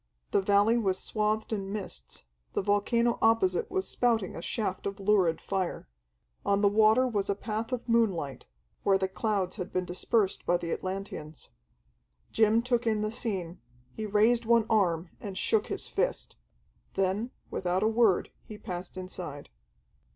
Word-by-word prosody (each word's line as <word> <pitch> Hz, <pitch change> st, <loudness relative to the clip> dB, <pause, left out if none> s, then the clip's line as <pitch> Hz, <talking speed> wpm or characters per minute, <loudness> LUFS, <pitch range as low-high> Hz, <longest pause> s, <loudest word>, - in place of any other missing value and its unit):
The -, -, +3 dB
valley 205 Hz, +4 st, +4 dB
was 190 Hz, -4 st, +1 dB
swathed 215 Hz, +2 st, -1 dB
in 195 Hz, -2 st, -3 dB
mists, 190 Hz, -, -7 dB, 0.3 s
the -, -, 0 dB
volcano 230 Hz, +4 st, +2 dB
opposite 225 Hz, -6 st, +3 dB
was 380 Hz, 0 st, -1 dB
spouting 230 Hz, -6 st, +1 dB
a -, -, -6 dB
shaft 200 Hz, -1 st, -2 dB
of 200 Hz, +1 st, -5 dB
lurid 190 Hz, -5 st, +3 dB
fire. 190 Hz, -3 st, -3 dB, 0.6 s
On 200 Hz, 0 st, +2 dB
the 205 Hz, -, +5 dB
water 220 Hz, +5 st, +4 dB
was 205 Hz, -5 st, -1 dB
a 200 Hz, -, +2 dB
path 220 Hz, +3 st, -4 dB
of 250 Hz, -1 st, -3 dB
moonlight, 190 Hz, -, 0 dB, 0.3 s
where 195 Hz, -1 st, +3 dB
the 190 Hz, 0 st, 0 dB
clouds 195 Hz, -1 st, -1 dB
had 180 Hz, -2 st, -5 dB
been 185 Hz, 0 st, -1 dB
dispersed 190 Hz, +3 st, 0 dB
by 175 Hz, -, +2 dB
the 170 Hz, -1 st, -5 dB
Atlanteans. 185 Hz, -5 st, -5 dB, 0.8 s
Jim 220 Hz, +1 st, +3 dB
took 240 Hz, -1 st, 0 dB
in 215 Hz, -1 st, +1 dB
the 215 Hz, -, -1 dB
scene, 190 Hz, -7 st, -3 dB, 0.3 s
he 215 Hz, -, -4 dB
raised 225 Hz, +3 st, +3 dB
one 230 Hz, -1 st, +4 dB
arm 175 Hz, -5 st, +2 dB
and 195 Hz, -2 st, -6 dB
shook 220 Hz, -1 st, +1 dB
his 400 Hz, -, -4 dB
fist. -, -, -1 dB, 0.6 s
Then, 195 Hz, +5 st, 0 dB, 0.2 s
without 185 Hz, +2 st, 0 dB
a -, -, +4 dB
word, 220 Hz, -4 st, +3 dB
he 215 Hz, -, -10 dB
passed 180 Hz, -3 st, -7 dB
inside. 180 Hz, -6 st, -6 dB
205 Hz, 160 wpm, -29 LUFS, 185-225 Hz, 0.8 s, the